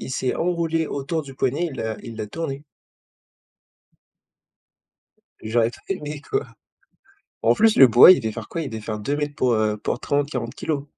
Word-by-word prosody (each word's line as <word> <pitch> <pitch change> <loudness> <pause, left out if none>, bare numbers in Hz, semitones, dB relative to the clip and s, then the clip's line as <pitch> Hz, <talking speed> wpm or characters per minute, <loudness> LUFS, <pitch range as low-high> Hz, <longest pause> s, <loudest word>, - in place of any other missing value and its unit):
Il - - -7
s'est 130 -1 -1
enroulé 165 -2 -1
autour 150 +3 -3
du 135 -1 -11
poignet, 135 +7 0
il 135 - -9
l'a 110 -3 -3
il 115 -1 -9
l'a 110 -1 -4
tourné. 140 +3 -5 2.8
J'aurais 115 +1 +1
trop - - -15
aimé, 150 -6 -4
quoi. 410 - -3 1.0
En - - +4
plus, 220 0 +3
le 135 - +9
boa, 120 +10 +9
il 185 - +5
devait 110 -1 -2
faire - - -7
quoi, 165 - -4
il 145 - -4
devait 110 -2 -6
faire 105 0 -5
2 140 +8 -2
mètres 145 -1 -3
pour, 125 -2 +1
heu, 110 -1 +1
pour 110 +3 -3
30-40 140 -5 -2
kilos. 145 -3 -3
135 Hz, 180 wpm, -23 LUFS, 115-160 Hz, 2.8 s, le